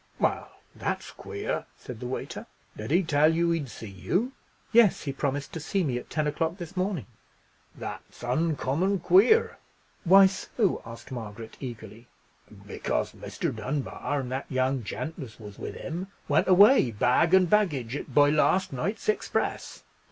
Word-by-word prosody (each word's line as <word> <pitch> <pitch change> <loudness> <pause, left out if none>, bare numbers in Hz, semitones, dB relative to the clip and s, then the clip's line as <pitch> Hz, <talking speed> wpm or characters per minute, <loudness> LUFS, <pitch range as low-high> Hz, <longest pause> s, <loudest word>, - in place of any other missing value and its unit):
"Well, - - 0 0.2
that's - - -4
queer," 420 -1 -4
said 125 -3 -9
the 125 - -5
waiter; 130 - -5 0.3
"did 110 - -6
he 175 +6 +3
tell 155 -1 +4
you 170 0 +2
he'd 155 -6 -1
see 115 - -9
you?" 175 - -1 0.4
"Yes, 230 -4 +5
he 140 - -3
promised 140 0 -2
to 165 - -4
see 185 +5 -1
me 125 -6 -1
at - - -13
ten 155 -1 -1
o'clock 160 +3 -1
this 175 0 -8
morning." 185 - -1 0.7
"That's - - -8
uncommon 160 +7 0
queer." 415 - +4 0.4
"Why 195 +2 +8
so?" 190 +1 0
asked 115 +2 -10
Margaret, 115 -2 -7
eagerly. 115 -2 -8 0.6
"Because - - -2
Mr. - - -4
Dunbar, 140 +4 -3
and 125 -1 -6
that 130 +1 -4
young 130 -1 0
gent 155 - -5
as 125 -6 -9
was 105 -2 -11
with - - -6
him, 180 +3 -5 0.2
went - - +2
away, 200 - +7
bag 125 - +3
and 185 -1 +5
baggage, 145 - +1
by 145 0 +5
last 165 +3 +2
night's 200 - -3
express." 430 - -1
150 Hz, 155 wpm, -27 LUFS, 125-185 Hz, 0.7 s, Why